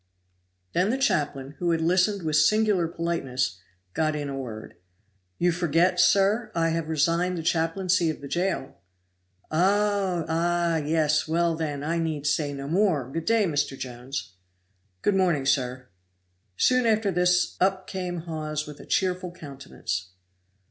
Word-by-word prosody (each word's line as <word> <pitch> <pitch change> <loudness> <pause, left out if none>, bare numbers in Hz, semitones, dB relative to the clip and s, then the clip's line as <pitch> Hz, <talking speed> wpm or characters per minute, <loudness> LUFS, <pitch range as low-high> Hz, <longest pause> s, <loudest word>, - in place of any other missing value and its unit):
Then 185 +3 +2
the 255 - +1
chaplain, 145 - 0
who 175 - 0
had 165 -1 +2
listened 180 +4 +2
with 155 -1 0
singular 195 +3 +3
politeness, 135 - -2 0.3
got 155 -1 0
in 145 -1 -3
a 140 - -4
word. 115 -5 -7 0.6
"You 175 0 +2
forget, 175 +1 +2
sir, 200 +6 +3
I 165 -1 +2
have 165 -1 -2
resigned 170 +4 +1
the 165 - -4
chaplaincy 170 +1 +1
of 155 - -4
the 140 - -8
jail?" 170 -5 -2 0.7
"Oh! 195 0 +1
ah! 170 +1 +1
yes! 155 0 +1
well, 170 +1 +1
then, 150 -3 -3
I 165 +2 -1
need 155 -3 -2
say 150 -1 +1
no 140 0 -6
more; 160 - +1
good 165 +2 -4
day, 225 -2 +3
Mr. 145 -5 -1
Jones." 125 -3 -6 0.7
"Good 205 - +3
morning, 175 -8 +2
sir." 130 -2 0 0.7
Soon 255 -2 +3
after 215 -2 +2
this 180 0 +2
up 190 0 +1
came 180 -3 -4
Hawes 155 -2 -4
with 150 -1 -10
a - - -12
cheerful 185 -1 0
countenance. 130 - -6
165 Hz, 150 wpm, -26 LUFS, 145-180 Hz, 0.7 s, singular